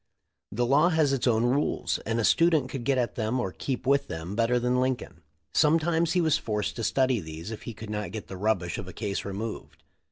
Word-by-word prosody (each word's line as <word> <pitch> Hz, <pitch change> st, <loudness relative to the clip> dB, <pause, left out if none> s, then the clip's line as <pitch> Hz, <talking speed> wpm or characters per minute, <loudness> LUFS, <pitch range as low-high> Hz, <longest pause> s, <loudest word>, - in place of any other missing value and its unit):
The 120 Hz, +4 st, 0 dB
law 145 Hz, +7 st, +4 dB
has 155 Hz, -5 st, +2 dB
its 135 Hz, -1 st, 0 dB
own 115 Hz, 0 st, +3 dB
rules, 135 Hz, +4 st, 0 dB
and 115 Hz, +1 st, 0 dB
a -, -, +1 dB
student 160 Hz, -2 st, +3 dB
could 130 Hz, -4 st, -5 dB
get 135 Hz, -1 st, +2 dB
at 120 Hz, -2 st, 0 dB
them 115 Hz, +2 st, -1 dB
or 95 Hz, -6 st, -2 dB
keep 130 Hz, +5 st, -4 dB
with 140 Hz, +1 st, +2 dB
them 80 Hz, +4 st, -5 dB
better 115 Hz, +2 st, +2 dB
than 125 Hz, +1 st, +1 dB
Lincoln. 130 Hz, -9 st, -2 dB, 0.3 s
Sometimes 165 Hz, +1 st, +3 dB
he 180 Hz, -, +3 dB
was 160 Hz, -3 st, +2 dB
forced 105 Hz, -2 st, -2 dB
to 115 Hz, -, -3 dB
study 130 Hz, 0 st, +2 dB
these 80 Hz, +3 st, -7 dB
if 110 Hz, -, -7 dB
he 115 Hz, -, -7 dB
could 110 Hz, -1 st, -8 dB
not 105 Hz, -1 st, -3 dB
get 110 Hz, -1 st, -6 dB
the 95 Hz, -, -8 dB
rubbish 95 Hz, -3 st, -1 dB
of 95 Hz, -, -6 dB
a 95 Hz, -, -8 dB
case 100 Hz, -1 st, -3 dB
removed. 95 Hz, -7 st, -6 dB
120 Hz, 225 wpm, -27 LUFS, 105-135 Hz, 0.3 s, law